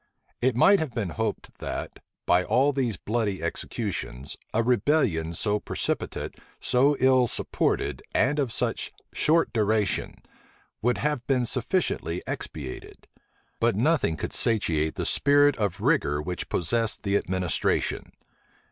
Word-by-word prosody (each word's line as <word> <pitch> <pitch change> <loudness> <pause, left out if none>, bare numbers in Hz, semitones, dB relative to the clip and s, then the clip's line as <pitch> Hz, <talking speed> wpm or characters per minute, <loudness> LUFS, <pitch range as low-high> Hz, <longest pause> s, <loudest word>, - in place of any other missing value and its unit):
It 130 -1 +2
might 195 +11 +6
have 150 -7 -3
been 100 -7 -2
hoped 110 +3 -4
that, - - -5 0.3
by 90 +1 +4
all 135 +8 +3
these 125 -7 -1
bloody 105 -4 -2
executions, 65 -5 -4 0.2
a 115 - +1
rebellion 115 - +1
so 105 +4 0
precipitate, - - -3 0.2
so 140 +3 +3
ill 130 -1 +4
supported, - - -1
and 145 +5 +2
of 135 -5 0
such - - -1 0.2
short 165 +2 +2
duration, 110 -3 +1 0.7
would 125 +2 +2
have 150 -4 -1
been 130 -3 +2
sufficiently 120 - -1
expiated: 70 -5 -7 0.5
but - - +2
nothing 80 - +2
could - - -4
satiate 80 -9 +1
the - - -2
spirit 145 0 +4
of 100 -5 -1
rigor 75 0 +2
which 90 +4 -4
possessed 110 +6 -1
the 100 -1 0
administration. 95 -3 0
115 Hz, 130 wpm, -26 LUFS, 90-130 Hz, 0.7 s, might